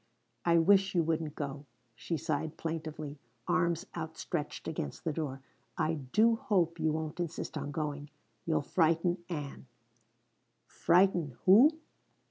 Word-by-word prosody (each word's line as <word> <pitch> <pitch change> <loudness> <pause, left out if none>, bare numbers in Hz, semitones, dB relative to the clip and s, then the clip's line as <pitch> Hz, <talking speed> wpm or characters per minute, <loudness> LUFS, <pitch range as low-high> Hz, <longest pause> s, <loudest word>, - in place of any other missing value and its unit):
"I 170 -1 +5
wish 195 +3 +4
you 170 - +4
wouldn't 160 -2 -1
go," 140 0 -5 0.3
she 120 +9 -3
sighed 155 0 -2
plaintively, 155 -3 -5 0.3
arms 170 -2 +1
outstretched 160 -1 -4
against 160 - -4
the 160 -3 -1
door. 140 -4 -4 0.4
"I 155 - +1
do 210 - +2
hope 185 -10 +1
you 160 0 +2
won't 155 +1 -4
insist 170 -2 -4
on 145 -2 -3
going. 145 -1 -4 0.3
You'll 160 -3 0
frighten 170 +2 +1
Ann." 145 -5 -6 1.0
"Frighten 175 -6 +2
_who? 255 - +7
160 Hz, 125 wpm, -31 LUFS, 150-175 Hz, 1.0 s, who